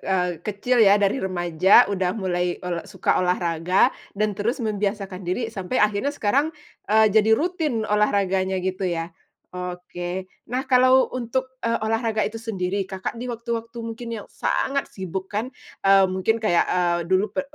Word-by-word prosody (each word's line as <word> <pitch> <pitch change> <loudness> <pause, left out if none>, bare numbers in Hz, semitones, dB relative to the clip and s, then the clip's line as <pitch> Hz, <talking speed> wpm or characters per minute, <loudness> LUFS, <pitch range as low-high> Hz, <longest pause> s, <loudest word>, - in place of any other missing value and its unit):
eee, 180 -3 -1
kecil 215 +5 -1
ya, 200 +1 +5
dari 200 +3 +2
remaja 185 -3 +4
udah 190 -3 0
mulai 180 -4 -2
ol 175 -2 -4
suka - - 0
olahraga, 180 0 +2 0.2
dan 210 -1 -1
terus 235 +6 -1
membiasakan 200 -3 -3
diri 220 +6 -2
sampai 200 +2 -2
akhirnya 210 +7 +1
sekarang, 280 +6 +1 0.4
eee, 220 0 +6
jadi 220 +1 +3
rutin 300 -5 0
olahraganya 195 -2 +1
gitu 185 +1 -2
ya. 170 -2 -2 0.4
Oke, 180 0 -6 0.2
nah 250 +2 -2
kalau 255 0 +5
untuk, 260 +1 -3
eee, 230 -1 0
olahraga 225 0 0
itu 215 +2 -1
sendiri, 200 -3 -2
Kakak 190 +4 -5
di 240 - -6
waktu-waktu 235 0 -5
mungkin 230 +1 -6
yang - - -12
sangat 275 +1 -1
sibuk 190 0 -6
kan, 215 +4 -1 0.4
eee, 195 0 +7
mungkin 190 +4 0
kayak, 215 -7 +2
eee, 175 -1 +1
dulu 190 +2 +1
p 280 - 0
200 Hz, 155 wpm, -23 LUFS, 185-230 Hz, 0.4 s, eee